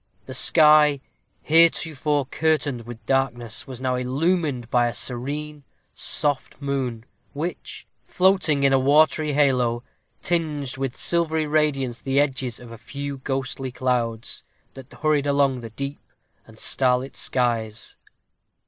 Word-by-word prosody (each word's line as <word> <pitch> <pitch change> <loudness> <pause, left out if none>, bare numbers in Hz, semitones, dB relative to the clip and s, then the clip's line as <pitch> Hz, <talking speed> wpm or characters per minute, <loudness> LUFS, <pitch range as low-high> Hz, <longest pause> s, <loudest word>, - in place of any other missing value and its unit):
The 130 - -8
sky, 150 0 +5 0.4
heretofore 155 -3 +2
curtained 145 -5 -1
with 115 -2 -10
darkness, 120 -4 -1
was 130 -2 -7
now 130 -1 -1
illumined 135 +1 0
by 120 -1 +3
a 120 - -4
serene, 145 +6 -2 0.3
soft 145 -3 -1
moon, 130 -5 -3 0.3
which, 165 +5 -6 0.2
floating 180 -6 +2
in 135 0 +4
a 135 - +4
watery 150 +2 +3
halo, 125 -5 +2 0.4
tinged 150 -6 -1
with 135 -2 -3
silvery 160 -2 +1
radiance 145 -5 0
the 135 +1 +1
edges 130 -4 -1
of 120 -1 -12
a 115 - -10
few 140 +4 -6
ghostly 135 -1 -3
clouds 120 -3 -2 0.3
that 135 -1 -12
hurried 150 -2 0
along 140 -2 +2
the 115 -1 -8
deep 140 +5 -6 0.5
and 110 -1 -16
starlit 130 +2 0
skies. 115 -3 -2
135 Hz, 125 wpm, -23 LUFS, 125-150 Hz, 0.5 s, sky